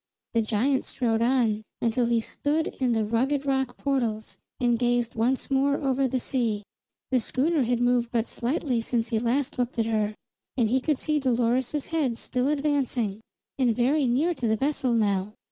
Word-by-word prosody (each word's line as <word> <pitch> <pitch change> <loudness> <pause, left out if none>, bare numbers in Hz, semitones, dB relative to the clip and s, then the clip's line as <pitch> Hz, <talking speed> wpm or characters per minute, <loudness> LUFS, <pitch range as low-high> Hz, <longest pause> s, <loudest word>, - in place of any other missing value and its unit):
The 230 - +3
giant 235 +5 +1
strode 230 -3 0
on, 235 -3 +2 0.2
until 235 +1 +1
he 235 -1 +2
stood 300 +7 -1
in 255 -3 +2
the 220 -1 +1
rugged 265 +6 0
rock 265 -2 0
portals 235 -6 -2 0.2
and 240 -2 +2
gazed 240 -1 +1
once 250 +5 0
more 275 +1 +3
over 270 -1 +1
the 255 +1 -1
sea. 230 -5 -1 0.5
The 255 - +4
schooner 285 +7 +1
had 245 -1 +1
moved 245 -1 +2
but 235 -1 0
slightly 250 -1 -1
since 230 0 -1
he 225 -3 +1
last 250 +4 -1
looked 245 0 -1
at 225 - +2
her; 215 -2 0 0.4
he 245 +1 +2
could 300 0 0
see 305 +1 0
Dolores's 255 +2 0
head 290 -8 -1
still 250 +2 -1
advancing, 275 -8 0 0.4
and 245 -4 +3
very 265 +4 +2
near 290 +9 +2
to 245 -7 -2
the 220 0 +2
vessel 270 -1 0
now. 205 -2 +1
245 Hz, 175 wpm, -26 LUFS, 230-270 Hz, 0.5 s, The